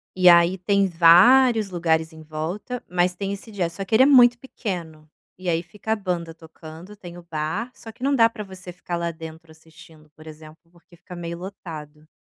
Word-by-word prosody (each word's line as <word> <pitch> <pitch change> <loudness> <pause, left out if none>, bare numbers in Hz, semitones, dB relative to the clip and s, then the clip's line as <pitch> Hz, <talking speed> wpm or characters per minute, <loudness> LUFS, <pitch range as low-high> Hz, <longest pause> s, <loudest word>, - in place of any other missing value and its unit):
e 180 -1 +6
aí, 170 +2 +5
tem 200 +1 +1
vários 195 +6 +5
lugares 160 -2 0
em 160 - -13
volta, 160 +11 -6
mas 180 0 0
tem 195 +1 -4
esse 210 +3 -10
jazz, 175 -4 -3
só 195 - -5
que 205 +3 -1
ele 260 - +6
é - - +5
muito 245 -4 +6
pequeno, 170 - -7 0.3
e 185 -1 -4
aí 165 +1 0
fica 210 +5 -8
a - - +3
banda 175 -5 -4
tocando. 165 +4 -13
Tem 175 -3 -11
o 175 - -12
bar, 170 +9 -4
só 225 - -12
que 245 - -14
não 280 0 +2
dá 230 -2 +5
pra 215 -2 -8
você 185 -2 -11
ficar 175 0 -6
lá 170 0 -2
dentro 160 0 -11
assistindo, 160 -1 -19
por 155 +1 -15
exemplo, 155 +2 -14
porque 175 0 -22
fica 180 +2 -12
meio 170 0 -6
lotado 155 -5 -10
175 Hz, 205 wpm, -23 LUFS, 160-200 Hz, 0.3 s, e